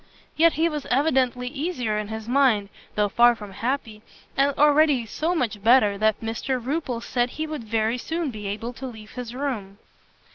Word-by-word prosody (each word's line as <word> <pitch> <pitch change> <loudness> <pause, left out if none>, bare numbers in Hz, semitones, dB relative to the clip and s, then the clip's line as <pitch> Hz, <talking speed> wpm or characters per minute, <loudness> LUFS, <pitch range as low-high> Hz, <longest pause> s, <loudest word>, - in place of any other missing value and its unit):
Yet 330 +1 +5
he 325 +2 +2
was 300 -3 -4
evidently 255 -2 +1
easier 255 -6 -2
in 210 - -4
his 220 0 -6
mind, 245 -6 +3 0.3
though 210 0 +2
far 240 +4 +5
from 210 -3 -10
happy, 225 0 -3 0.3
and 275 +1 +3
already 295 -4 +4
so 320 +10 -1
much 225 - -1
better, 225 -2 +5
that 215 -1 +2
Mr 230 +3 -2
Rupil 255 -1 -3
said 245 0 0
he 310 +5 -4
would 305 -7 -6
very 225 +2 0
soon 325 +1 -2
be 210 -3 -6
able 220 +4 -4
to 265 +2 -7
leave 220 -3 -11
his 245 -1 -7
room. 225 -8 -4
245 Hz, 180 wpm, -24 LUFS, 220-280 Hz, 0.3 s, Yet